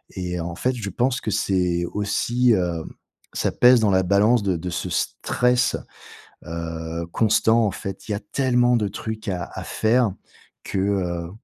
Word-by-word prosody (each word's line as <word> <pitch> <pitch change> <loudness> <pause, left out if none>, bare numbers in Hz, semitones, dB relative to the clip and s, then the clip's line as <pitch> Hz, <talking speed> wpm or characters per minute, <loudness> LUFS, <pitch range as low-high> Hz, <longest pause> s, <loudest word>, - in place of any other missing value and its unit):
Et 90 -1 -3
en 85 0 -4
fait, 130 +6 -1
je 110 -5 -4
pense 125 +6 0
que 110 - -3
c'est 90 -3 +1
aussi, 115 +4 +1
heu, 85 -3 -1 0.5
ça - - 0
pèse 125 0 +6
dans 105 - +3
la 95 0 +3
balance 105 +4 +3
de 95 -3 +1
de 90 +2 -5
ce 85 - -3
stress, 125 0 +1 0.7
heu, 85 0 -5
constant, 110 +1 +3
en - - +1
fait. 95 +2 -7
Il 105 - -1
y - - 0
a - - -5
tellement 125 -2 +3
de 105 -3 0
trucs 110 +2 -6
à 90 -2 -2
à - - -6
faire 110 -1 +2 0.5
que, 95 - -3
heu, 90 -4 -1
100 Hz, 175 wpm, -23 LUFS, 90-115 Hz, 0.7 s, pèse